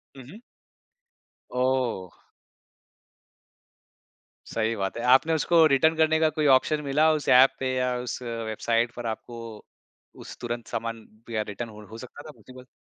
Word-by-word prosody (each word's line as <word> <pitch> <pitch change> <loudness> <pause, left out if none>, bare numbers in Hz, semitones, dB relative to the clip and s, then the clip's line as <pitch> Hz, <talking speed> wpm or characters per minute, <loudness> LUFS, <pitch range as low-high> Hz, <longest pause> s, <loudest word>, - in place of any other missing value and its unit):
हुँ, 130 - -11
हुँ। 210 - -12 1.1
ओह! 125 -8 -2 2.2
सही 115 0 -1
बात 95 +1 -3
है। 120 - -4
आपने 160 +5 +3
उसको 165 +1 +4
रिटर्न 155 +3 +3
करने 160 0 +2
का 160 -1 +3
कोई 155 -1 0
ऑप्शन 150 +3 +3
मिला 150 +3 +3
उस 150 - -3
ऐप 130 +1 +6
पे 130 -1 -1
या 125 0 0
उस 125 0 -5
वेबसाइट 115 0 -2
पर 120 -1 -7
आपको 115 +1 -6 0.9
उस - - -10
तुरंत 120 -1 -5
सामान 115 0 -5 0.2
या 110 -2 -1
रिटर्न 115 +3 -6
हो 105 0 -12
हो 110 - -10
सकता 125 +4 -11
था - - -9
पॉसिबल? 130 -2 -15
125 Hz, 150 wpm, -26 LUFS, 115-145 Hz, 2.2 s, ऐप